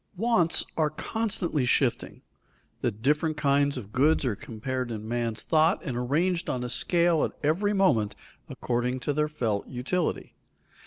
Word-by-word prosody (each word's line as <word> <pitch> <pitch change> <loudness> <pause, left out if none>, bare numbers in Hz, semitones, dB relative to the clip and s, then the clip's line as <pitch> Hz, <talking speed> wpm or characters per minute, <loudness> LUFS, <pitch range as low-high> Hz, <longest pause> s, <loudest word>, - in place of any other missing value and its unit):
Wants 190 -6 +2
are 155 -2 +2
constantly 185 - -2
shifting; 125 - 0 0.8
different 150 +4 +1
kinds 140 -1 +2
of 105 -5 -8
goods 145 +3 +3
are 120 -5 0
compared 125 +4 -5
in 110 -1 -6
man's 115 -1 -2
thought 160 +2 +3
and 135 -8 -4
arranged 160 +9 0
on 125 -1 -2
a 125 - -4
scale 170 +2 +3
at - - -2
every 180 +8 +1
moment 140 - +2 0.3
according 125 +1 -2
to 145 - -1
their 150 +1 +1
felt 115 -9 -2
utility. 140 +8 -2
145 Hz, 145 wpm, -27 LUFS, 125-165 Hz, 0.8 s, goods